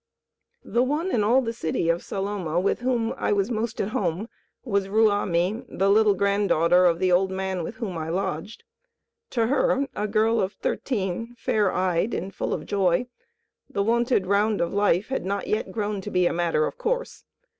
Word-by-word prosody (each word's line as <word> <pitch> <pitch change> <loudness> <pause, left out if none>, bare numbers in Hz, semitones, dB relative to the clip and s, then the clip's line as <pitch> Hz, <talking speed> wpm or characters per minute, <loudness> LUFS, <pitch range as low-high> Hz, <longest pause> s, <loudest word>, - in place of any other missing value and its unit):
The 235 - +1
one 300 +8 0
in 215 - +2
all 245 +5 +4
the 230 -1 -3
city 165 -5 -2
of 170 +1 +1
Saloma 195 -4 -2
with 190 - 0
whom 240 -2 0 0.3
was 200 +4 0
most 225 0 -2
at 200 - -1
home 205 -2 -2 0.3
was 200 -5 0
Ruamie, 205 0 +1
the 195 +1 +1
little 210 -1 +4
granddaughter 185 -3 +3
of 170 -1 +2
the 185 +1 +1
old 185 +2 +3
man 190 -1 -2
with 170 - -6
whom 200 -7 -4
I 160 0 -4
lodged. 185 +4 -3 0.7
To 230 -3 +1
her, 275 +2 +2
a 210 - -1
girl 220 +2 +2
of 190 +2 -2
thirteen, 230 0 -3
fair 210 -4 +1
eyed 185 +3 0
and 190 +3 -4
full - - -3
of - - -3
joy, 195 +4 +1 0.6
the 200 - -1
wonted 235 -2 +2
round 205 +2 +2
of 170 - -1
life 205 0 +2
had 265 - -2
not 200 +2 -2
yet 215 -3 -2
grown 205 -1 -2
to - - -6
be 180 -1 +2
a - - +2
matter 170 -3 +1
of - - -6
course. - - -2
200 Hz, 185 wpm, -25 LUFS, 185-225 Hz, 0.7 s, all